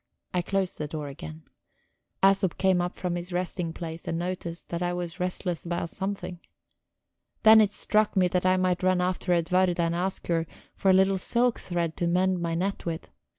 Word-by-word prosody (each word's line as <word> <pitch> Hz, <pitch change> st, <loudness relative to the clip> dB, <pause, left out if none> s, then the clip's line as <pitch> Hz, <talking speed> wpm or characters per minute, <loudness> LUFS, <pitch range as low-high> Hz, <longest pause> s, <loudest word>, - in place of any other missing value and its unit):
I 180 Hz, -, +2 dB
closed 190 Hz, +1 st, -2 dB
the 150 Hz, -, -2 dB
door 150 Hz, -1 st, -5 dB
again; 80 Hz, -, -9 dB, 0.8 s
Æsop 195 Hz, -2 st, +4 dB
came 190 Hz, -2 st, +3 dB
up 175 Hz, 0 st, -3 dB
from 180 Hz, -1 st, -2 dB
his 175 Hz, +1 st, -5 dB
resting 175 Hz, -1 st, -2 dB
place 165 Hz, -1 st, -7 dB
and 165 Hz, -, -1 dB
noticed 175 Hz, -1 st, -4 dB
that 170 Hz, 0 st, -3 dB
I 175 Hz, 0 st, 0 dB
was 175 Hz, 0 st, -5 dB
restless 180 Hz, -1 st, -2 dB
about 170 Hz, -1 st, -2 dB
something. 190 Hz, -1 st, -4 dB, 1.0 s
Then 220 Hz, 0 st, +9 dB
it 205 Hz, -2 st, +3 dB
struck 215 Hz, -1 st, +1 dB
me 185 Hz, -1 st, +5 dB
that 180 Hz, 0 st, 0 dB
I 185 Hz, 0 st, +4 dB
might 185 Hz, -1 st, +1 dB
run 185 Hz, 0 st, +3 dB
after 180 Hz, 0 st, -1 dB
Edwarda 180 Hz, +1 st, +2 dB
and 170 Hz, 0 st, +1 dB
ask 185 Hz, +2 st, -2 dB
her 165 Hz, -1 st, 0 dB, 0.3 s
for 195 Hz, -, +1 dB
a -, -, +7 dB
little 190 Hz, 0 st, +3 dB
silk 240 Hz, +5 st, +1 dB
thread 170 Hz, -2 st, -2 dB
to 175 Hz, -, 0 dB
mend 185 Hz, +1 st, +2 dB
my 165 Hz, -1 st, -1 dB
net 195 Hz, +4 st, -2 dB
with. 165 Hz, -1 st, -4 dB
180 Hz, 195 wpm, -27 LUFS, 170-190 Hz, 1.0 s, Then